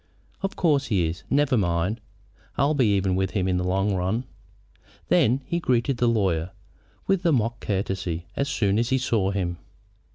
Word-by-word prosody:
"Of 195 - -3
course 150 -5 +2
he 95 -6 +1
is. 85 +2 -5
Never 145 -1 +2
mind. 90 +2 0 0.6
I'll 140 +2 +3
be 130 -6 +3
even 95 -1 +1
with 95 0 0
him 95 -1 0
in 90 -1 +1
the 90 - -1
long 95 +3 +1
run." 95 +6 -1 0.9
Then 130 +5 +3
he 170 +5 -1
greeted 130 -3 +1
the 120 - +2
lawyer 95 -7 +1 0.6
with 195 -2 +1
a 170 - +3
mock 120 -3 0
courtesy 95 -4 -2
as 140 0 -1
soon 105 -6 +1
as 115 - 0
he 130 - +2
saw 115 -6 +1
him. 90 -3 -2
105 Hz, 175 wpm, -25 LUFS, 95-130 Hz, 0.9 s, I'll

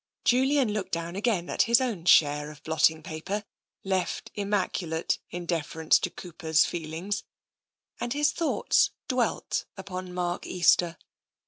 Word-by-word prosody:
Julian 260 -2 +3
looked 190 -3 -4
down 170 +1 -3
again 200 -4 0
at - - +1
his 235 - +6
own 230 -10 -2
share 150 -3 +5
of 150 -1 -13
blot 160 0 +2
ting 160 0 +2
paper, 190 +7 -4 0.4
left 190 -1 -2
immaculate 190 -5 -1
in 175 0 -6
deference 160 -1 +2
to - - -2
Cooper's 160 -2 0
feelings, 170 +5 -4 0.8
and 240 - -3
his 295 +2 +2
thoughts 330 +1 +2 0.2
dwelt 250 -3 -1
upon 185 -1 -6
Mark 180 -1 -3
Easter. 175 -1 +3
180 Hz, 135 wpm, -27 LUFS, 160-210 Hz, 0.8 s, his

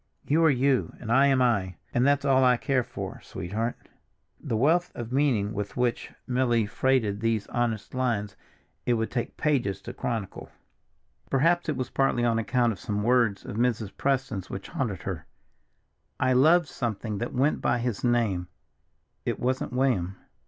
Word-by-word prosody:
You 160 +3 +3
are - - +6
you, 135 -1 +1
and 115 -2 -5
I 135 +4 +5
am 135 -2 +3
I, 100 -7 +1 0.2
and 120 +3 +3
that's 140 0 +2
all 130 -1 +4
I 125 -1 +5
care 130 +1 +1
for, 125 +2 -7
sweetheart." 110 +7 -3 0.6
The 115 - -2
wealth 170 +8 +2
of 120 0 -6
meaning 125 -7 +1
with 105 -1 -5
which 125 -1 -1
Milly 125 -3 +2
freighted 110 -2 +1
these 115 -2 0
honest 115 -3 -2
lines 115 -6 -1 0.5
it 120 - +3
would 110 0 -2
take 120 -2 -3
pages 125 - 0
to - - -7
chronicle; 110 -6 -4 0.8
perhaps 165 +5 +2
it 150 - -1
was 130 - -3
partly 130 -3 +1
on 115 -1 +2
account 120 +1 +1
of 100 - -7
some 105 0 -2
words 120 -4 +2
of - - -6
Mrs. 115 -4 0
Preston's 130 -8 -1
which 95 - -6
haunted 115 - -3
her: 85 -5 -5 0.9
"I 130 0 +3
loved 160 +7 +5
something 110 -5 -3
that 120 - -4
went 135 +4 +2
by - - +2
his 120 -3 -3
name—it 105 -8 -3
wasn't 130 +1 -1
William." 120 -8 0
120 Hz, 165 wpm, -27 LUFS, 105-130 Hz, 0.9 s, are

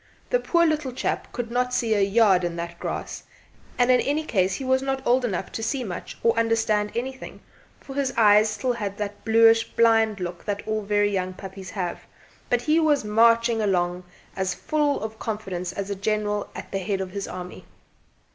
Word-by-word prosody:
The - - +3
poor 340 -6 +2
little 305 -4 0
chap - - -3
could 240 -1 -5
not 250 +1 0
see 225 -2 +1
a 205 - +2
yard 195 -2 +4
in 175 -1 -2
that 170 0 -6
grass; - - -5 0.6
and 245 0 +4
in 250 - +5
any 295 +3 0
case 190 -9 +1
he 270 - -5
was 260 0 +2
not 270 0 -2
old 250 +1 +3
enough 190 -5 -2
to - - -5
see 255 +3 -1
much, 180 -6 -7
or 230 - +4
understand 225 -2 +1
anything, 260 +2 -5 0.4
for 270 - -10
his 275 -1 0
eyes 215 -1 +6
still 245 +4 -1
had 205 -4 -4
that 205 -1 -5
bluish 225 0 +5
blind 225 -2 +3
look 175 -1 -5
that 205 -1 -3
all 215 0 -1
very 205 0 +1
young 185 -1 -2
puppies 190 0 -9
have, 180 -4 -4 0.4
but 245 0 +1
he 310 +4 +3
was 300 -5 +2
marching 230 +1 +3
along 180 -3 0 0.3
as 190 -1 -1
full 295 -2 0
of 220 0 -6
confidence 195 -5 -4
as 200 +1 -5
a - - -1
general 210 +1 -1
at - - -8
the 195 - -1
head 195 +1 -2
of 190 -1 -4
his 200 0 -4
army. 180 0 -8
215 Hz, 195 wpm, -24 LUFS, 195-245 Hz, 0.6 s, eyes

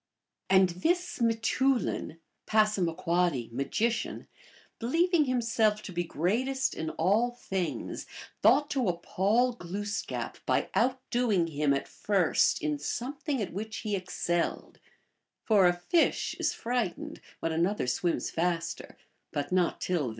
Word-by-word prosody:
And 190 -1 +6
this 340 - -1
m^teoulin 230 -3 +1 0.3
(P., 175 - +1
magician), 220 - -1 0.5
believing 330 +6 +2
himself 225 -4 +1
to - - -7
be 175 0 -1
greatest 250 - 0
in 160 - -3
all 205 +9 +2
things, 195 -7 -4 0.3
thought 290 +1 +4
to 260 -6 +1
appall 200 +8 +1
Glooskap 205 0 -4
by - - +1
outdoing 245 -6 +1
him 150 -1 +1
at 140 0 0
first 195 -5 +1
in 150 -1 -1
something 265 - -3
at 185 - -6
which 215 +4 -5
he 210 -1 0
excelled; 175 -2 -2 0.6
for 205 -5 +5
a 175 - +4
fish 175 - +1
is - - +1
frightened 240 -6 -3 0.2
when 165 - -1
another 170 +4 +1
swims 165 +7 -1
faster, 170 0 -2 0.3
but 145 +2 -3
not 180 -2 +1
till! 165 -8 0
200 Hz, 120 wpm, -29 LUFS, 175-240 Hz, 0.6 s, And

